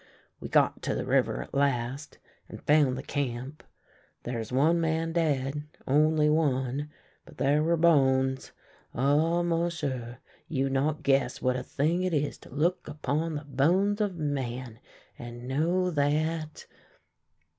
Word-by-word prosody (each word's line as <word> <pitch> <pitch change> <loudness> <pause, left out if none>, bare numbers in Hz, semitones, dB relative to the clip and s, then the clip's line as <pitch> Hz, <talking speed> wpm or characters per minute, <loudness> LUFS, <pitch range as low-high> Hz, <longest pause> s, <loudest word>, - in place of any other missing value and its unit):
We - - -7
got - - +2
to - - -2
the - - -3
river - - +1
at - - -17
last, 140 0 -1 0.3
and - - -10
found 145 -4 +3
the 135 - -6
camp. 135 0 -4 0.6
There 120 -1 -3
is 110 +1 -6
one 155 +6 +3
man 165 0 0
dead 145 -3 0
— - - -29
only 150 +2 +3
one; 145 -2 0 0.3
but - - -17
there 145 +2 +2
were 170 +2 +2
bones 130 -5 +3 0.2
— - - -29
ah, 155 +7 +2
m'sieu', 165 -8 -2 0.3
you 135 -3 -1
not 145 +3 0
guess 135 0 +2
what 130 -1 +1
a 130 - -2
thing 155 +7 0
it 185 -3 0
is 145 0 -1
to - - -15
look 155 +7 -1
upon 155 +2 -2
the 145 0 -5
bones 180 - +2
of 200 -3 0
men, 130 -6 -3 0.4
and 120 +1 -8
know 170 +7 +1
that 155 +1 -1
145 Hz, 150 wpm, -28 LUFS, 130-160 Hz, 0.6 s, found